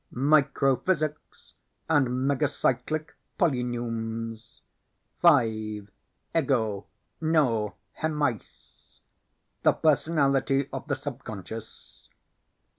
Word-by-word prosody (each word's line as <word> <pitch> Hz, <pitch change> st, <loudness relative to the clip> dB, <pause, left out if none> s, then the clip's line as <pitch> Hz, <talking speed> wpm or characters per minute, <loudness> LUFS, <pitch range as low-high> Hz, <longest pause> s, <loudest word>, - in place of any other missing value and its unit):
Microphysics 150 Hz, +3 st, +1 dB, 0.3 s
and 145 Hz, -5 st, +3 dB, 0.2 s
Megacyclic 145 Hz, +1 st, 0 dB, 0.3 s
Polyneums. 115 Hz, -5 st, -2 dB, 0.6 s
5. 110 Hz, -2 st, +3 dB, 0.4 s
Ego, 105 Hz, -3 st, +1 dB, 0.3 s
No, 130 Hz, -10 st, +2 dB, 0.3 s
Hemeis 150 Hz, -, -4 dB, 0.6 s
the -, -, +5 dB
Personality 140 Hz, -3 st, +2 dB
of -, -, -5 dB
the 145 Hz, -, 0 dB
Subconscious. 115 Hz, -6 st, -9 dB
135 Hz, 60 wpm, -27 LUFS, 115-150 Hz, 0.6 s, the